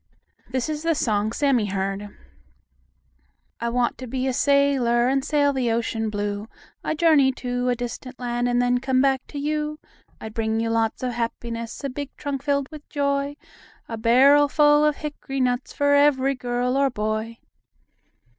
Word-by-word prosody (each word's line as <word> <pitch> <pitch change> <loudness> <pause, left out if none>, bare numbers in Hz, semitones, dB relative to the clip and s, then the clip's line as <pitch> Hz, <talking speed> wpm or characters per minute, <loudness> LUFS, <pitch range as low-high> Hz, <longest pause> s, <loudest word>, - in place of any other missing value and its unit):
This 255 +1 -1
is 305 -1 -3
the 330 0 +1
song 215 -6 0
Sammie 255 -5 +1
heard: 195 +1 -3 1.5
"I 235 - -1
want 240 0 0
to 255 - -7
be 260 +2 -2
a 260 - 0
sailor 265 -4 +3
And 270 +1 +1
sail 285 -1 +2
the 255 -3 0
ocean 225 -1 -1
blue. 205 0 -3 0.4
I'd 315 - -2
journey 305 -5 +5
to 250 -1 -2
a 245 - +2
distant 245 +2 -7
land 245 0 -1
And 245 0 +2
then 245 0 +2
come 260 0 +1
back 265 -1 +2
to 290 - -8
you. 300 +1 -2 0.4
I'd 220 - -8
bring 220 0 -1
you 225 0 -1
lots 225 +1 0
of 250 - 0
happiness, 230 +1 -4
A 275 - -2
big 285 +1 -5
trunk 280 -2 -4
filled 280 -1 0
with 300 -1 -11
joy; 280 0 -1 0.5
A 230 - -4
barrel 265 +6 +5
full 295 +1 +4
of 300 -1 +3
hickory 290 -2 -5
nuts 250 0 0
For 285 0 +2
every 280 -2 +4
girl 250 0 -1
or 275 0 +3
boy." 215 0 -3
255 Hz, 170 wpm, -23 LUFS, 235-280 Hz, 1.5 s, journey